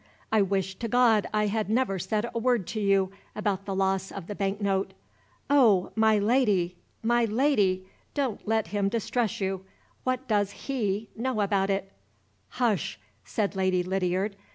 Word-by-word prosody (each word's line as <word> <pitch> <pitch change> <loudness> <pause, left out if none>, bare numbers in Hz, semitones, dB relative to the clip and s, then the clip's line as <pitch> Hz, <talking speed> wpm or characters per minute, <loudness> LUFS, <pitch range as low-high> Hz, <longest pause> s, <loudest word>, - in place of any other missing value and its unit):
"I 220 -1 +4
wish 195 -1 0
to 235 - -2
God 230 -3 +3
I 210 0 +2
had 210 0 -1
never 220 -4 +1
said 215 +5 -1
a 230 - -1
word 240 -4 +2
to 220 - -3
you 195 -2 +2 0.2
about 200 -2 -1
the 195 -1 -3
loss 190 0 0
of 195 -4 -7
the 205 - -5
bank 200 0 -2
note! 195 -1 0 0.5
Oh, 235 -10 +4
my 220 -1 +4
Lady! 205 -5 +2 0.3
my 240 +1 +3
Lady! 210 -6 +2 0.3
don't 265 -9 -2
let 220 -5 +1
him 200 0 0
distress 225 0 -1
you! 190 -1 -2 0.4
What 255 0 -1
does 205 -3 +2 0.2
he 215 -6 -1
know 235 -1 -1
about 195 -1 +1
it?" 195 0 -2 0.6
"Hush!" 220 - 0 0.3
said 200 - -1
Lady 185 -1 +1
Lydiard. 190 +2 -1
205 Hz, 160 wpm, -27 LUFS, 195-225 Hz, 0.6 s, I